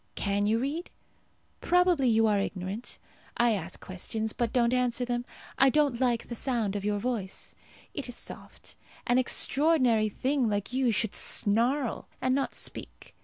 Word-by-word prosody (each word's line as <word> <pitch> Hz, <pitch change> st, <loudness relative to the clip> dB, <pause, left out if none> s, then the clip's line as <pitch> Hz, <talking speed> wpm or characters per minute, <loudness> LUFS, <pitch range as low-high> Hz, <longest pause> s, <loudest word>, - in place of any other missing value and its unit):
Can 205 Hz, 0 st, 0 dB
you 220 Hz, +2 st, +3 dB
read? 290 Hz, +8 st, -3 dB, 0.7 s
Probably 355 Hz, -7 st, +3 dB
you 225 Hz, 0 st, +4 dB
are 210 Hz, -2 st, +3 dB
ignorant. 195 Hz, +3 st, -4 dB, 0.4 s
I 240 Hz, 0 st, +4 dB
ask 190 Hz, -4 st, -3 dB
questions, 215 Hz, +4 st, -3 dB
but 235 Hz, -2 st, -1 dB
don't 240 Hz, -1 st, +2 dB
answer 250 Hz, 0 st, +1 dB
them. 240 Hz, 0 st, -2 dB, 0.3 s
I 270 Hz, -, +7 dB
don't 280 Hz, -3 st, +2 dB
like 240 Hz, -2 st, +1 dB
the -, -, -5 dB
sound 230 Hz, -4 st, -1 dB
of 200 Hz, -, -3 dB
your 205 Hz, 0 st, 0 dB
voice. 210 Hz, -4 st, -3 dB, 0.4 s
It 285 Hz, -4 st, -5 dB
is 245 Hz, -, -4 dB
soft. -, -, -7 dB, 0.3 s
An 245 Hz, +1 st, +3 dB
extraordinary 255 Hz, -4 st, +2 dB
thing 260 Hz, +2 st, 0 dB
like 205 Hz, +3 st, -2 dB
you 260 Hz, -1 st, +2 dB
should 220 Hz, -1 st, +1 dB
snarl, 235 Hz, +5 st, 0 dB
and 255 Hz, -, +1 dB
not 275 Hz, 0 st, -1 dB
speak. -, -, -7 dB
240 Hz, 160 wpm, -29 LUFS, 210-260 Hz, 0.7 s, I